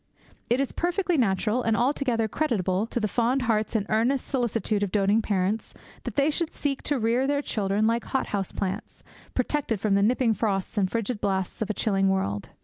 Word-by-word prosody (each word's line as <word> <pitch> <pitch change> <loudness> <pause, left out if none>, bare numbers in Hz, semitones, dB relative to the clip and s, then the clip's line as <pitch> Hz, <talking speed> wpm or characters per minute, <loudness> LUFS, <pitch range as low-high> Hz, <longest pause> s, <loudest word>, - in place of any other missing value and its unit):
It 240 +2 +2
is 275 - 0
perfectly 355 +1 0
natural, 225 - +1
and 225 -2 +1
altogether 245 -3 +1
creditable 210 - 0
to 240 - -2
the 215 - 0
fond 245 +4 +1
hearts 220 -1 0
and 210 -2 +1
earnest 240 +5 +1
solicitude 230 -5 0
of 200 -3 -1
doting 205 +2 +3
parents, 205 +1 -1 0.3
that - - -4
they 285 +2 +3
should 330 +1 -2
seek 275 -2 -2
to 290 - +1
rear 240 +3 +1
their 285 0 0
children 205 -2 0
like 230 +1 +1
hot 265 - -1
house 195 -2 -2
plants, 195 +2 -4 0.3
protected 255 -4 0
from 205 0 +1
the 200 - +4
nipping 230 +2 +3
frosts 200 -2 -1
and 195 -3 +1
frigid 230 -1 -2
blasts 190 -1 -1
of 220 - -1
a 215 - -1
chilling 195 -3 +2
world. 105 - -1
225 Hz, 195 wpm, -26 LUFS, 200-255 Hz, 0.3 s, the